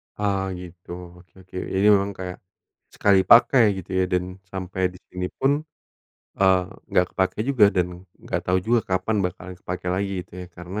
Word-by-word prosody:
Oh 100 -2 0 0.2
gitu. 90 -1 -11 0.3
Oke 90 0 -22
oke. 90 - -17 0.2
Jadi 100 +2 +3
memang 100 +1 0
kayak 90 -1 -6 0.6
sekali 100 -1 +4
pakai 120 +1 +7
gitu 95 -1 -8
ya - - +3
dan 90 0 +2 0.3
sampai 95 0 -4
di 90 - -14
sini 90 0 -3
pun, 135 - +3 0.9
eee, 95 -1 +5 0.3
nggak 90 - +3
kepakai 95 +2 0
juga 130 -6 +5
dan 90 -1 +3 0.3
enggak - - -3
tahu 90 0 +3
juga 120 +1 +4
kapan 100 +4 0
bakalan 90 +1 -5
kepakai 90 0 -5
lagi 100 +1 -1
gitu - - -36
ya. 90 - -7
Karena, 90 +4 -6
95 Hz, 170 wpm, -24 LUFS, 90-100 Hz, 0.9 s, pakai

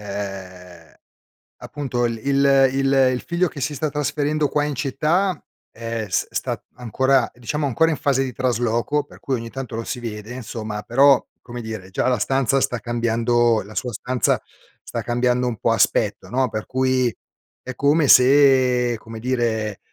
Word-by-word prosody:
ehm, 95 -4 -8 0.7
appunto, 130 -4 -3
l 115 -1 -2
il 140 -1 +4
il 135 0 +1 0.2
il 125 - -3
figlio 175 +1 +1
che 145 - -9
si 145 +3 -2
sta 150 +2 -1
trasferendo 150 +1 -1
qua 145 +1 0
in 145 -1 -2
città, 155 +7 0 0.3
è 115 -1 -5
s - - 0
sta - - -3
ancora 130 +1 +1
diciamo 145 +5 -3
ancora 160 +6 +2
in 155 - -2
fase 135 -1 +1
di 130 - -4
trasloco, 120 +3 0
per - - -17
cui 135 - -2
ogni 115 -1 -6
tanto 130 -3 -6
lo 115 - -3
si 125 - -5
vede 110 -1 -7
insomma, 110 -4 -6
però, 135 +2 +4 0.2
come 120 0 -8
dire, 110 -4 -7
già 95 - -1
la 125 -2 +2
stanza 135 +3 +1
sta 125 -3 -1
cambiando 120 -1 +1
la 105 +2 -13
sua 125 - -2
stanza 125 +2 0 0.4
sta - - -4
cambiando 125 +1 0
un 115 -3 -3
po' 115 - +1
aspetto, 105 -2 +1
no; 130 +1 +1
per 110 0 -4
cui 130 -2 +1 0.5
è 130 - -7
come 145 +2 +2
se 130 -2 +5
come 110 +1 -10
dire, 110 -4 -1
125 Hz, 170 wpm, -21 LUFS, 115-135 Hz, 0.7 s, se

